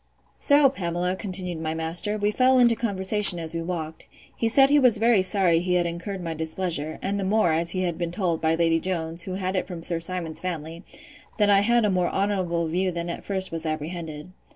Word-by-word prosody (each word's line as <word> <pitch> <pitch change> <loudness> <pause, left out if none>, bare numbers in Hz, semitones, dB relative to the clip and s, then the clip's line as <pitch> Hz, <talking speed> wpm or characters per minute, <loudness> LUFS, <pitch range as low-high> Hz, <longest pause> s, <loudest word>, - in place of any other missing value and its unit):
So, 285 -1 +5
Pamela, 180 -7 -2
continued 180 -4 -2
my 160 0 -3
master, 165 +6 -1
we 205 0 0
fell 255 +3 +3
into 240 -2 +5
conversation 200 -3 +2
as 165 -1 -4
we 165 - -3
walked. 165 -2 -5 0.3
He 230 - 0
said 270 +4 +5
he 295 - +6
was 250 -5 +4
very 225 -2 +3
sorry 185 -3 +2
he 180 +1 -1
had 175 -1 +2
incurred 180 +3 -5
my 165 -1 -3
displeasure; 160 -1 -3
and 200 +1 -1
the - - -2
more, 195 -3 +2
as 165 +1 +1
he 185 +1 -1
had 175 -2 -3
been 170 -1 -2
told, 175 -3 -1
by 160 0 +2
Lady 165 0 +2
Jones, 165 -2 -3
who 185 - -5
had 190 0 -3
it 185 - -1
from 175 -3 -7
Sir 170 -1 0
Simon's 170 -2 -4
family, 165 -2 -5 0.6
that 205 -1 +3
I 200 - +6
had 235 +2 +2
a 205 - +1
more 180 -2 +1
honourable 185 -4 -1
view 180 +3 0
than 170 0 -4
at - - -7
first 190 -1 -2
was 165 -1 -4
apprehended. 155 0 -5
180 Hz, 220 wpm, -24 LUFS, 165-200 Hz, 0.6 s, he